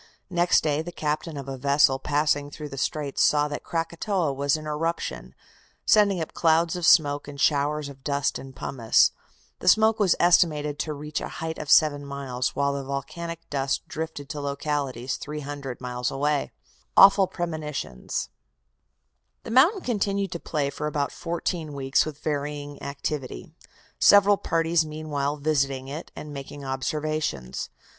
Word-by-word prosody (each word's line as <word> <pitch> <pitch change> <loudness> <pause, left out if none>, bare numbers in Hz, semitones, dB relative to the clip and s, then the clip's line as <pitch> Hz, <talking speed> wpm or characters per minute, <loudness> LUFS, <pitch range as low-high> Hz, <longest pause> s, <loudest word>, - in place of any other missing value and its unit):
Next 175 0 +3
day 150 -1 +1
the 175 +2 -7
captain 155 0 -3
of 140 -1 -7
a 135 -1 -5
vessel 140 0 +3
passing 145 0 +1
through 150 0 -8
the 135 - -7
Straits 145 -1 -1
saw 150 0 +4
that 145 - -5
Krakatoa 170 0 -1
was 140 +2 +1
in 155 - -9
eruption, 150 - -3 0.5
sending 205 -3 +4
up 160 - -4
clouds 165 +1 +2
of 175 -2 0
smoke 145 -3 +4
and 145 -1 -9
showers 145 +1 +1
of 135 -1 -12
dust 140 -1 0
and 135 -1 -11
pumice. 120 -3 +3 0.5
The - - -7
smoke 220 +3 +5
was 200 -4 +4
estimated 150 -4 +3
to 155 - -2
reach 150 +1 -4
a - - -4
height 160 0 -4
of 150 - -6
seven 145 -1 +5
miles, 135 -3 -3
while 140 +1 +1
the 140 0 -3
volcanic 165 +5 -5
dust 135 -1 -1
drifted 160 -3 -5
to 145 - -4
localities 140 -3 -2
300 145 -3 -6
miles 125 -1 -3
away. 145 +1 0 0.5
AWFUL 195 0 +8
PREMONITIONS 155 - -4 1.1
The - - -7
mountain 320 - +5
continued 200 - -1
to 170 - -4
play 145 -4 -2
for 150 +2 -4
about 145 -2 -1
fourteen 170 -2 -3
weeks 135 +1 +1
with 150 -2 -6
varying 145 -1 -3
activity, 140 - -5 0.5
several 205 0 +6
parties 165 -1 +1
meanwhile 150 -2 -3
visiting 135 -3 0
it 150 +4 -7
and 150 -1 -8
making 140 0 -8
observations. 135 - -2
150 Hz, 150 wpm, -25 LUFS, 140-165 Hz, 1.1 s, AWFUL